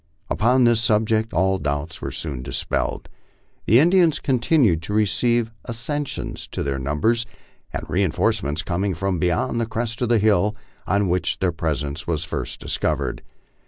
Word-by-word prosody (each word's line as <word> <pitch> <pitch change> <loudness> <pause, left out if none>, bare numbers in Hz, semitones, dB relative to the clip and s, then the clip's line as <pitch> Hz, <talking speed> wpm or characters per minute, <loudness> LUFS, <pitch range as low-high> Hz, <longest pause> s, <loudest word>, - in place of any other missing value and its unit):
Upon 125 +4 +3
this 120 -1 +4
subject 110 -1 +2
all 95 +3 +1
doubts 75 +2 -3
were - - -3
soon 70 -6 -4
dispelled. 65 0 -2 0.6
The 110 - +6
Indians 170 0 +4
continued 120 - +2
to 95 +5 -5
receive 115 +2 +2 0.2
accessions 130 +5 -3
to - - -4
their 70 -1 -2
numbers, 75 - +1 0.4
the - - -4
reinforce 90 -3 +1
ments 75 +3 -2
coming 95 +2 -1
from 95 +1 -1
beyond 90 +7 0
the 115 - -1
crest 115 +1 -3
of 120 - +1
the 120 - +4
hill 105 0 +2 0.3
on 100 0 +2
which 90 -2 0
their 95 -2 +1
presence 75 -2 -3
was 80 -2 -1
first - - -4
discovered. - - -1
100 Hz, 155 wpm, -22 LUFS, 80-115 Hz, 0.6 s, The